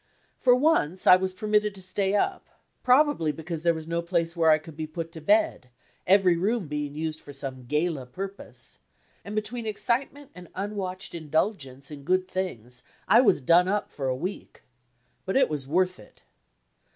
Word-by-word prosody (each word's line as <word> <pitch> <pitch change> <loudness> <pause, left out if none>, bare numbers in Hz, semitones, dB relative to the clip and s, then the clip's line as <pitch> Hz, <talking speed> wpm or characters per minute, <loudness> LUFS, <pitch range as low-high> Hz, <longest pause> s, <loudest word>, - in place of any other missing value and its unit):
For 245 -1 +5
once 250 - +2
I 180 - +9
was 185 0 -1
permitted 210 +1 0
to 190 - -7
stay 195 +2 -1
up, 390 - -1 0.3
probably 255 - +3
because 160 +2 -6
there 170 0 +2
was 160 -1 -6
no 170 +1 -1
place 170 -1 -1
where 165 -1 +3
I 155 - +6
could 155 0 -12
be 155 0 -4
put 165 +1 -6
to 165 -2 -9
bed, 180 -8 +2 0.4
every 185 -2 +5
room 200 +2 0
being 145 -1 -4
used 155 0 -4
for 145 - -11
some 130 -2 -6
gala 150 -2 -1
purpose, 195 +9 -7 0.4
and 205 - -7
between 220 +2 -3
excitement 260 +6 -2
and 180 -1 -12
unwatched 195 -1 -4
indulgence 155 -4 -2
in 145 -2 -8
good 185 +5 +1
things 125 - -4 0.3
I 235 - +7
was 200 - +3
done 170 +7 +5
up 205 +2 -1
for 135 -2 -4
a 130 - 0
week. 180 +9 -6 0.6
But 190 +6 0
it 270 - +4
was 145 -3 -4
worth 180 +4 +1
it! 105 - -18
180 Hz, 175 wpm, -26 LUFS, 155-205 Hz, 0.6 s, I